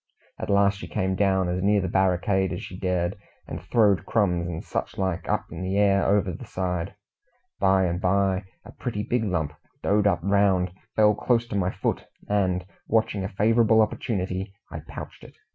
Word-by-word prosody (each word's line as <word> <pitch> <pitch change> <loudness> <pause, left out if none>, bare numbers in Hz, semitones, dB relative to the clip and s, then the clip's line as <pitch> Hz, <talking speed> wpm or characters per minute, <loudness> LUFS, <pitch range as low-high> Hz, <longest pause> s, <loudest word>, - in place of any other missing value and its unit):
At - - -5
last 100 0 +3
she 85 - -7
came 95 +4 -1
down 95 -1 +2
as 90 +1 -1
near 100 +2 +3
the 95 - -1
barricade 95 +1 +1
as 90 - -5
she 90 - -8
dared, 90 -1 -1 0.3
and - - -6
throwed 105 -5 +3
crumbs 90 -6 +1
and 85 -2 -5
such - - -4
like 95 -3 -2
up - - 0
in 85 +1 -6
the 95 +2 -1
air 100 -1 +4
over 100 -2 +2
the - - -8
side. 90 -2 -3 0.6
By 95 -1 +4
and 90 0 -1
by 95 +1 +1 0.2
a - - -10
pretty 110 -5 -4
big 120 +2 0
lump, 80 -8 -1 0.3
doughed 105 0 +3
up 85 -5 +1
round, 95 -2 +2 0.2
fell 105 -1 +5
close 120 +2 +1
to 105 - -4
my 90 -2 +1
foot, - - -2 0.2
and, 90 -3 +1 0.2
watching 110 -3 +1
a 95 - -3
favourable 110 +2 +3
opportunity, 95 -3 -1 0.2
I - - -5
pouched - - -9
it. - - -14
95 Hz, 185 wpm, -25 LUFS, 90-100 Hz, 0.6 s, fell